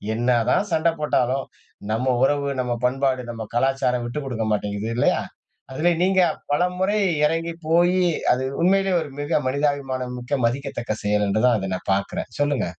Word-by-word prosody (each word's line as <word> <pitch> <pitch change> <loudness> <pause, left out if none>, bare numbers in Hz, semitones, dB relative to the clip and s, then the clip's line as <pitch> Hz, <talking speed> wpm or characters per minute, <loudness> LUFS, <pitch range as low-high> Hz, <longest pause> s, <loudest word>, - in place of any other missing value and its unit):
என்னதான் 120 - +1
சண்டை 160 +1 +2
போட்டாலும் 130 -2 +1 0.5
நம்ம 125 +4 +1
உறவு, 140 0 0
நம்ம 125 -1 -1
பண்பாடு, 130 0 0
நம்ம 115 -1 -6
கலாச்சாரம் 125 -1 +1
விட்டுக்கொடுக்க 120 -3 -3
மாட்டிங்குது 105 +1 -2
இல்லேயா? 120 - +2 0.5
அதுலே 160 +6 +1
நீங்க 190 0 +3 0.3
பல 145 +4 +3
முறை 195 +3 +1 0.3
இறங்கிப் 165 +2 -2
போயி 175 +3 +3 0.3
அது 125 +1 +1 0.2
உண்மையிலே 195 +2 +3
ஒரு 145 - -6
மிக 145 +2 +1
மனிதாபிமானமிக்க 130 -2 -1
மதிக்கத்தக்க 120 -3 -2
செயல் 105 0 +1
என்று 110 +3 +1
தான், 120 -2 +4
அதை 95 -2 -3
நான் 95 - -7
பாக்கறேன். 100 +1 -3
சொல்லுங்க. 145 -5 +1
135 Hz, 145 wpm, -23 LUFS, 120-155 Hz, 0.5 s, தான்